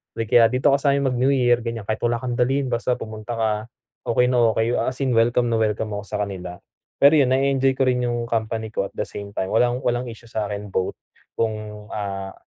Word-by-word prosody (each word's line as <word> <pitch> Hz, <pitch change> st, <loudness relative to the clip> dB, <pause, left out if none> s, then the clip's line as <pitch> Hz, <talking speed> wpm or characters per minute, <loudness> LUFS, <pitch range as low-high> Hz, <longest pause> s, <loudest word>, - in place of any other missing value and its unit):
Like 115 Hz, -1 st, -4 dB
kaya, 115 Hz, -1 st, +7 dB
"Dito 130 Hz, +4 st, +2 dB
ka 140 Hz, -, +3 dB
sa'min 140 Hz, -2 st, +2 dB
mag-New-Year," 125 Hz, -1 st, +3 dB
ganiyan, 115 Hz, -2 st, -5 dB
"kahit 110 Hz, +1 st, -2 dB
wala 120 Hz, -, +1 dB
kang 125 Hz, -1 st, -3 dB
dalhin, 135 Hz, +1 st, +1 dB
basta 120 Hz, +1 st, 0 dB
pumunta 110 Hz, 0 st, -6 dB
ka." 110 Hz, -1 st, +1 dB, 0.6 s
okey 125 Hz, +2 st, +3 dB
na 120 Hz, -3 st, +3 dB
okey 115 Hz, +1 st, +1 dB
yo -, -, +1 dB
as 130 Hz, -, -2 dB
in 130 Hz, -, +1 dB
welcome 120 Hz, +1 st, +2 dB
na 115 Hz, -, +1 dB
welcome 110 Hz, 0 st, 0 dB
ako 105 Hz, -1 st, -5 dB
sa 105 Hz, -, -2 dB
kanila. 90 Hz, -3 st, -6 dB, 0.5 s
Pero 150 Hz, +2 st, +7 dB
yun 130 Hz, -2 st, +3 dB
na-e-enjoy 135 Hz, 0 st, +2 dB
ko 135 Hz, -, +1 dB
rin 125 Hz, -1 st, +2 dB
yung 120 Hz, 0 st, -1 dB
company 110 Hz, -1 st, -2 dB
ko 100 Hz, -2 st, -1 dB
at -, -, -23 dB
the -, -, -1 dB
same 100 Hz, 0 st, -9 dB
time 95 Hz, -, -2 dB
walang 125 Hz, +3 st, +2 dB
walang 120 Hz, +1 st, 0 dB
issue 115 Hz, 0 st, -11 dB
sa'kin 105 Hz, -2 st, -4 dB
both 95 Hz, 0 st, -1 dB, 0.4 s
kung, 110 Hz, -1 st, -3 dB
ah, 95 Hz, -2 st, -4 dB
115 Hz, 215 wpm, -22 LUFS, 110-125 Hz, 0.6 s, kaya